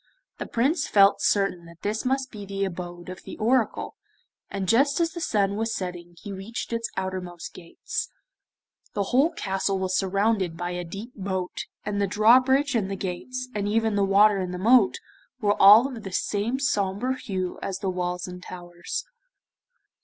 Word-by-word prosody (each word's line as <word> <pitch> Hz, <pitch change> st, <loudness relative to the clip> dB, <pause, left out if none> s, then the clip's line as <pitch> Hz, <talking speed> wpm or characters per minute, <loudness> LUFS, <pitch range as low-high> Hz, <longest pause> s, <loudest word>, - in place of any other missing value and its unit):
The -, -, -4 dB
Prince 285 Hz, +7 st, +1 dB
felt 200 Hz, -1 st, +5 dB
certain 195 Hz, -4 st, +1 dB
that 170 Hz, 0 st, -16 dB
this 215 Hz, +3 st, -2 dB
must 265 Hz, 0 st, 0 dB
be 210 Hz, -3 st, -8 dB
the 195 Hz, 0 st, -2 dB
abode 175 Hz, -1 st, -7 dB
of 185 Hz, 0 st, -8 dB
the -, -, -9 dB
Oracle, 230 Hz, 0 st, +1 dB, 0.6 s
and 195 Hz, -1 st, -3 dB
just 275 Hz, -, +3 dB
as 335 Hz, -1 st, +1 dB
the 340 Hz, -, -7 dB
sun 200 Hz, -7 st, +1 dB
was 225 Hz, +1 st, -1 dB
setting 175 Hz, -2 st, -6 dB
he 200 Hz, -, -7 dB
reached 205 Hz, +5 st, -6 dB
its 230 Hz, 0 st, -2 dB
outermost 185 Hz, -2 st, -4 dB
gates. 170 Hz, -2 st, -5 dB, 0.9 s
The 205 Hz, -, +1 dB
whole 275 Hz, +6 st, +5 dB
castle 195 Hz, 0 st, -1 dB
was 190 Hz, 0 st, -1 dB
surrounded 195 Hz, -2 st, +1 dB
by 175 Hz, +1 st, -3 dB
a 180 Hz, 0 st, -3 dB
deep 200 Hz, +8 st, -8 dB
moat, 190 Hz, -2 st, -4 dB, 0.2 s
and 205 Hz, 0 st, -1 dB
the 200 Hz, -, +2 dB
drawbridge 255 Hz, +7 st, +4 dB
and 210 Hz, -5 st, 0 dB
the 195 Hz, -, -2 dB
gates, 200 Hz, +8 st, -5 dB
and 205 Hz, -1 st, -2 dB
even 220 Hz, +1 st, +1 dB
the 200 Hz, -1 st, +2 dB
water 200 Hz, +1 st, +5 dB
in 185 Hz, -1 st, -2 dB
the 180 Hz, -, -4 dB
moat, 225 Hz, +2 st, +5 dB, 0.4 s
were 205 Hz, -1 st, +1 dB
all 210 Hz, +6 st, +9 dB
of 250 Hz, -5 st, -7 dB
the 195 Hz, -, -7 dB
same 210 Hz, +6 st, -1 dB
sombre 235 Hz, 0 st, 0 dB
hue 190 Hz, -9 st, -4 dB
as 190 Hz, -, -3 dB
the 190 Hz, -1 st, -2 dB
walls 180 Hz, 0 st, -3 dB
and 180 Hz, 0 st, -8 dB
towers. 175 Hz, -, -6 dB
200 Hz, 175 wpm, -25 LUFS, 185-230 Hz, 0.9 s, all